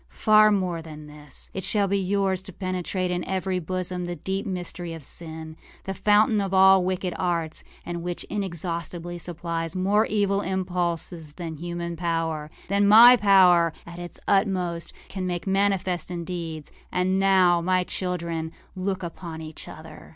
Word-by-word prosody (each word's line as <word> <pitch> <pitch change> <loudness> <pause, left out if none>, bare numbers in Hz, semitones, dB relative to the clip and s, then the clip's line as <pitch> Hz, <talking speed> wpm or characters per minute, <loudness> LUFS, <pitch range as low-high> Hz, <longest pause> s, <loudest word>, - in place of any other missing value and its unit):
Far 215 0 +5
more 180 -4 0
than 155 -2 -10
this. 150 -2 -9
It 190 - -4
shall 205 +1 +2
be 200 +1 +1
yours 190 -1 0
to 190 - -8
penetrate, 185 0 -2
in 175 0 -1
every 190 -1 -1
bosom, 180 +1 -3
the 175 - -3
deep 190 +5 -3
mystery 175 -2 -5
of 160 - -10
sin, 160 +2 -6 0.3
the 195 - -4
fountain 210 +2 +3
of 195 -1 -1
all 190 0 +7
wicked 185 -1 -2
arts, 170 -3 -1 0.2
and 170 -1 -4
which 175 0 -4
inexhaustibly 175 -2 -4
supplies 170 -1 -4
more 200 +4 +2
evil 200 -1 +1
impulses 175 -4 -2
than 165 -2 -6
human 170 +1 -4
powerâthan 165 +3 -1
my 235 +4 +10
power 185 -6 +5
at 170 +1 -9
its 175 0 -7
utmostâcan 190 -2 -1
make 175 -1 -3
manifest 195 -2 0
in 175 -1 -4
deeds. 165 -4 -5 0.2
And 185 +1 +1
now, 185 -3 +4
my 185 +1 +2
children, 170 -3 -3 0.2
look 190 0 -2
upon 170 -1 -7
each 155 0 -8
other. 160 0 -11
180 Hz, 150 wpm, -25 LUFS, 170-190 Hz, 0.3 s, my